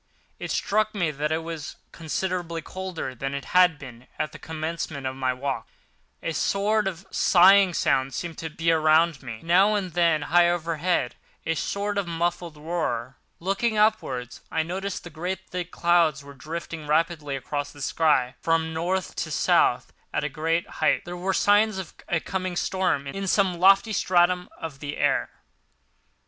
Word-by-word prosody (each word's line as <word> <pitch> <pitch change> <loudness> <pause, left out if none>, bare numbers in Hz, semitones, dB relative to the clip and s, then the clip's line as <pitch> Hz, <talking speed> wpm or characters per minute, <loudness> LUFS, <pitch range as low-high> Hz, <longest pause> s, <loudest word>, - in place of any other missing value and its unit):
It - - -5
struck 215 +1 0
me 175 -6 0
that 150 +1 -2
it 160 +1 -1
was 165 -3 -6 0.2
considerably 170 0 -3
colder 185 -8 -5
than 135 +3 -4
it 140 -1 -5
had 180 -3 +5
been 125 -2 -12
at 155 - -2
the - - -11
commencement 160 -3 -4
of 130 0 -2
my 130 -1 0
walk—a 135 +5 -6
sort 205 +4 +1
of 190 0 -5
sighing 190 0 +6
sound 130 -1 +1
seemed 170 -2 -5
to 160 - -4
be 165 +2 0
around 160 -1 +3
me, 115 -4 -6
with, 110 - -15
now 190 +5 +4
and 185 -5 -2
then, 165 -3 +2
high 175 +2 +4
overhead, 170 -4 -1 0.3
a 165 - +1
sort 200 +4 -2
of 195 - -3
muffled 170 -1 -2
roar. 150 -6 -3 0.2
Looking 200 +5 0
upwards 135 - 0
I 160 - 0
noticed 190 +4 -4
that 175 - -10
great 180 +3 -4
thick 180 -1 -4
clouds 170 -5 +2
were 140 0 -11
drifting 155 +2 -7
rapidly 155 -2 0
across 145 +2 -4
the 145 - -15
sky 135 -3 +2
from 160 0 +1
North 180 +4 -1
to - - -2
South - - +2 0.2
at - - -1
a 150 - -1
great 165 +3 -1
height. - - +2
There 175 0 -6
were 180 +2 -1
signs 205 +1 +3
of 190 -4 -6 0.3
coming 185 -2 -3
storm 180 -6 0
in 195 +8 -4
some 185 -3 +2
lofty 195 +4 +5
stratum 180 -1 +2
of 160 -5 -7
the 145 +1 -5
air. - - +1
165 Hz, 165 wpm, -25 LUFS, 150-185 Hz, 0.3 s, sighing